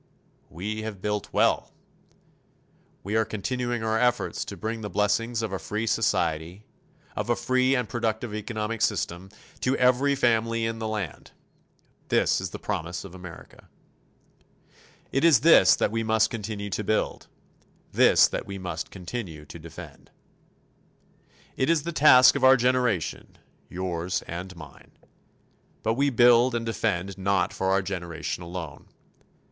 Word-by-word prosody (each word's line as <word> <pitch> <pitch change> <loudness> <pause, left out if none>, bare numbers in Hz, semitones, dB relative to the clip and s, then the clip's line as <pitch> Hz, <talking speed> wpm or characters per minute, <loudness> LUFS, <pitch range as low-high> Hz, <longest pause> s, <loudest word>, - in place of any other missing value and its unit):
We 105 +6 -5
have 110 -3 -6
built 105 +1 -3
well. - - +1 1.3
We 100 +3 -3
are 110 - +4
continuing 120 +2 -3
our 110 0 0
efforts 125 -1 0
to - - -8
bring 110 +1 -4
the 105 - -5
blessings 115 +3 0
of 105 -3 -3
a 95 - -2
free 105 +7 -3
society, 85 -2 -1 0.5
of - - -3
a 120 - +3
free 130 +2 +1
and 125 -3 -1
productive 110 0 -2
economic 110 +1 -4
system, 85 +3 -1 0.3
to 130 +2 0
every 130 +3 +3
family 115 -2 +1
in 115 0 -3
the 110 - -3
land. 105 -5 -5 0.7
This - - +2
is - - -4
the - - -7
promise 85 +2 -4
of 95 -3 -11
America. 90 -2 -12 1.4
It 135 - 0
is 160 -8 +6
this 165 +3 +7
that - - 0
we 115 0 -1
must 110 0 +2
continue 105 -2 -5
to 100 +4 -2
build 110 +2 -1 0.6
this - - +5
that - - -5
we 100 0 -6
must 90 -3 -5
continue 90 -5 -7
to 75 +3 -11
defend. 80 0 -12 1.5
It 130 - 0
is 165 -3 +2
the 170 - -3
task 135 -5 +7
of 140 - -2
our 130 0 +7
generation, 120 -8 0 0.3
yours 90 0 -3
and 90 +2 -7
mine. 75 -4 -14 0.9
But 110 - +1
we 140 +4 +2
build 120 0 +5
and 115 -1 -2
defend 100 -4 -2
not 95 -1 +1
for 95 - -1
our 95 0 +2
generation 85 -3 -4
alone. 85 -3 -8
110 Hz, 145 wpm, -26 LUFS, 95-120 Hz, 1.5 s, this